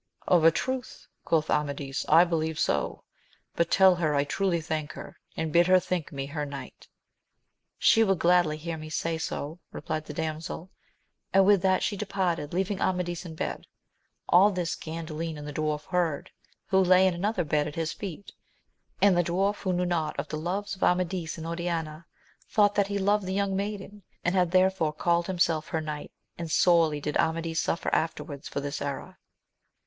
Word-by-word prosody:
Of 175 -3 +4
a 165 - +9
truth, 260 +8 -4 0.2
quoth 160 -2 +1
Amadis, 140 -2 -2
I 165 +3 +8
believe 160 -2 -1
so; - - -1 0.5
but 170 0 +1
tell 190 -1 +6
her 155 -4 +1
I 140 - +3
truly 180 +3 0
thank 155 -1 -3
her, - - -10 0.2
and 160 -1 -2
bid 170 +1 +5
her 185 0 +6
think 180 -3 -3
me 135 -2 -4
her 150 +2 -4
knight. 140 -3 -8 0.9
She 225 - +5
will 195 -3 +3
gladly 175 -3 +3
hear 165 +1 -5
me 155 0 -8
say 165 +1 -2
so, 160 +1 -4
replied 155 0 -4
the 150 - -7
damsel; 160 +3 -4 0.6
and 195 0 +6
with 200 -2 +5
that 190 0 +2
she 205 - 0
departed, 185 -7 -2
leaving 190 +2 -1
Amadis 180 -1 -1
in 160 - -8
bed. - - -4 0.6
All 190 +4 +6
this 180 -4 -2
Gandalin 160 0 -5
and 150 0 -8
the 150 - -6
dwarf 150 0 -2
heard, 170 -5 -1 0.4
who 190 - +4
lay 185 +1 +5
in 185 - +3
another 185 +2 -1
bed 150 -1 0
at 150 - -7
his 165 -1 -2
feet; 195 -1 -7 0.7
and 200 -2 +6
the 175 - +3
dwarf, 195 +4 0
who 190 - -2
knew 180 0 0
not 170 -3 -1
of - - -4
the - - -3
loves 195 +6 -3
of 190 - -19
Amadis 180 -2 0
and 160 - -7
Oriana, 165 -2 -3 0.4
thought 205 -1 +4
that 200 -1 +2
he 200 0 -2
loved 200 0 +1
the 190 - -2
young 200 -1 0
maiden, 205 +1 -4 0.2
and 180 - +1
had 180 -2 +2
therefore 185 -3 +2
called 170 +2 +1
himself 170 -4 +1
her 160 - -1
knight, 150 -1 -6 0.3
and 170 -1 -4
sorely 165 -2 +4
did 150 +1 -2
Amadis 165 0 0
suffer 170 - -2
afterwards 155 -3 -2
for 140 - -3
this 145 0 -4
error. 140 -1 -5
170 Hz, 185 wpm, -27 LUFS, 155-185 Hz, 0.9 s, a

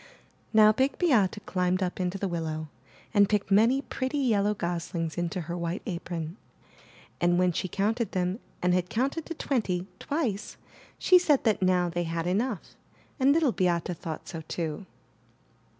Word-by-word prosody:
Now 215 -1 +7
Big 265 +5 +1
Beate 230 - +3
climbed 180 0 0
up 180 +1 -3
into 185 +1 -1
the 195 - -2
willow 160 -3 -3 0.4
and 205 -2 +5
picked 205 -1 0
many 230 +7 +4
pretty 260 +2 -3
yellow 210 -6 +2
goslings 170 -2 -3
into 175 +1 -2
her 170 +2 -5
white 170 +2 -3
apron, 170 -2 -4 0.8
and 175 0 +3
when 180 0 +3
she 180 - -2
counted 210 +4 -1
them 185 +3 -1 0.2
and 180 0 +3
had 180 0 0
counted 275 +7 -1
to 335 - -5
twenty, 200 -12 -1
twice, 255 -10 -2 0.4
she 365 -1 +6
said 300 -6 +3
that 215 -4 +2
now 180 -1 +3
they 175 0 -2
had 165 0 -2
enough, 205 +3 -2 0.4
and 270 +1 +5
Little 305 -3 +3
Beate 175 -3 0
thought 160 -1 -7
so 165 - -6
too. 165 +2 -4
185 Hz, 160 wpm, -28 LUFS, 175-225 Hz, 0.8 s, Now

